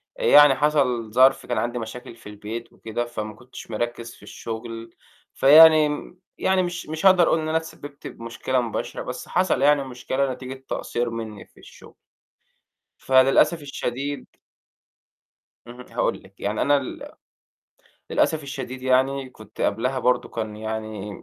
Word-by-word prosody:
يعني 145 -2 +6
حصل 130 -6 +1
ظرف 130 +2 +4
كان 120 - -2
عندي 120 +2 -2
مشاكل 120 +1 -8
في 115 - -13
البيت 105 +3 -8
وكده، 115 +2 -4
فما 110 -2 -6
كنتش 120 -1 -12
مركِّز 120 +1 -4
في - - -20
الشُغل. 115 0 -8 0.4
فيعني 155 +2 +7
م 175 +4 -7 0.2
يعني 190 -1 +2
مش 175 -2 -5
مش 160 +4 -4
هاقدر 185 -3 +6
أقول 165 - +2
إن 155 - -3
أنا 160 - +2
اتسبِّبت 145 -3 -8
بمشكلة 115 +2 -3
مباشرة، 115 -2 -4
بس - - -7
حصل 180 -6 +1
يعني 145 0 +4
مشكلة 130 +1 -2
نتيجة 130 +1 -8 0.2
تقصير 120 0 -2
مني 110 -2 -7
في - - -24
الشُغل. - - -16 1.0
فللأسف 135 +5 +3
الشديد 140 0 -4 1.4
اهم، 120 +1 -11
هاقول - - -1
لِك. 95 +1 -20
يعني 105 +1 -1
أنا 145 0 +4
ال 135 -2 -6 1.0
للأسف 155 -1 +1
الشديد 130 -2 -7
يعني 130 +1 +1
كنت 110 -3 -14
قبلها 125 +6 0
برضه 125 0 +1
كان 110 -2 -5
يعني 110 -2 -6
130 Hz, 145 wpm, -23 LUFS, 115-145 Hz, 1.4 s, فيعني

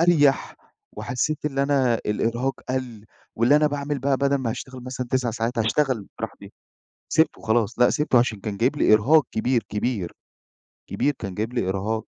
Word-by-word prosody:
أريح 150 -5 +3 0.4
وحسيت 150 +5 -2
اللي 140 -2 0
أنا 135 -4 +2
الإرهاق 120 +5 -1
قَل 125 -5 -4 0.3
واللي 120 +6 +4
أنا 150 - +4
باعمل 145 -1 -2
بقى 135 +1 +1
بدل 140 +1 +2
ما 130 -4 -2
هاشتغل 130 +1 -7
مثلًا 130 -1 -4
9 130 -2 +1
ساعات 115 +2 -2
هاشتغل 115 -1 +1
براحتي - - -7 0.6
سيبْتُه 160 0 +2
خلاص 110 0 0
لأ 125 - +6
سيبْتُه 150 -5 +2
عشان 120 -3 0
كان 105 0 -5
جايب 125 +7 +1
لي 110 - +4
إرهاق 135 +8 +5
كبير، 120 +1 0
كبير. 105 -4 -2 0.8
كبير 145 - 0
كان 100 -3 -5
جايب 110 +4 -3
لي 95 -7 -1
إرهاق. 105 +3 -2
125 Hz, 165 wpm, -24 LUFS, 110-140 Hz, 0.8 s, لأ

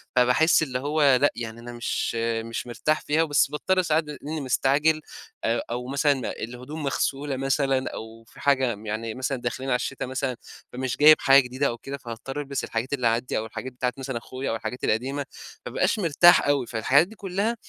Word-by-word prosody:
فباحس 125 +7 +4
اللي 130 -4 -2
هو 145 0 +3
لأ، 145 - +4
يعني 115 -1 -6
أنا 120 +1 -9
مش 120 0 -2
مش 115 +1 -2
مرتاح 155 +6 0
فيها، 155 +2 +2
بس 145 -3 +2
باضطر 185 +5 +1
ساعات 160 -2 +1
بما 150 -1 -8
إني 155 +1 -4
مستعجل 140 +4 +2 0.4
أ 115 +1 +1
أو 125 +1 -3
مثلًا 140 -1 +1
الهدوم 125 +7 -7
مغسولة 140 0 -1
مثلًا 135 0 0
أو 110 +1 -9
في 115 - -18
حاجة 130 -4 +2
م 105 +2 -13
يعني 110 +1 -3
مثلًا 130 +2 -2
داخلين 125 +3 -3
على 125 - +3
الشتا 130 +2 -3
مثلًا 130 0 -2 0.4
فمش 130 0 -3
جايب 155 +1 +8
حاجة 135 0 +6
جديدة 130 +3 -1
أو 120 - -3
كده، 140 +3 -7
فهاضطر 125 +3 -7
ألبس 140 -1 -4
الحاجات 115 +5 -3
اللي 125 -4 +1
عندي 115 +2 0
أو 110 - -2
الحاجات 130 +3 -7
بتاعة 125 0 -1
مثلًا 135 -2 -4
أخويا 130 +3 -5
أو - - -1
الحاجات 125 +2 -6
القديمة، 135 +6 -1 0.4
ما - - -5
ابقاش 220 - +1
مرتاح 175 -2 +5
أوي، 140 -3 +2
فالحاجات 130 +8 +3
دي 220 - -13
كلها 200 +4 -1
135 Hz, 195 wpm, -25 LUFS, 120-145 Hz, 0.4 s, جايب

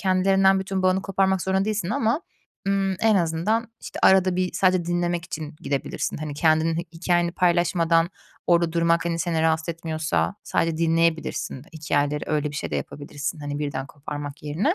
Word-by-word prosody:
kendilerinden 190 0 +3
bütün 190 0 -2
bağını 185 +1 +2
koparmak 190 -1 +1
zorunda 190 0 +1
değilsin 210 -3 -1
ama, 240 +4 +1 0.5
ımm, 195 -1 +1
en 220 -2 +4
azından, 180 +7 0
işte, - - -8
arada 185 -1 +5
bir 185 -1 0
sadece 185 -2 +2
dinlemek 175 0 -1
için 155 -2 -6
gidebilirsin. 140 -1 -2
Hani, 150 -1 -5
kendinin 160 +1 +2 0.2
hikâyeni 175 0 +1
paylaşmadan 170 -1 +2 0.4
orada 170 -2 +3
durmak, 170 0 +2
hani, 170 -1 -1
seni 165 -1 0
rahatsız 160 0 +1
etmiyorsa 155 - -1
sadece 165 -1 0
dinleyebilirsin 165 -4 0
hikâyeleri, 150 -1 0
öyle 150 -1 0
bir 150 - -7
şey - - -4
de - - -1
yapabilirsin. 145 +1 -5
Hani, 145 0 -4
birden 140 -2 -3
koparmak 145 0 -7
yerine 165 - 0
170 Hz, 160 wpm, -24 LUFS, 155-185 Hz, 0.5 s, arada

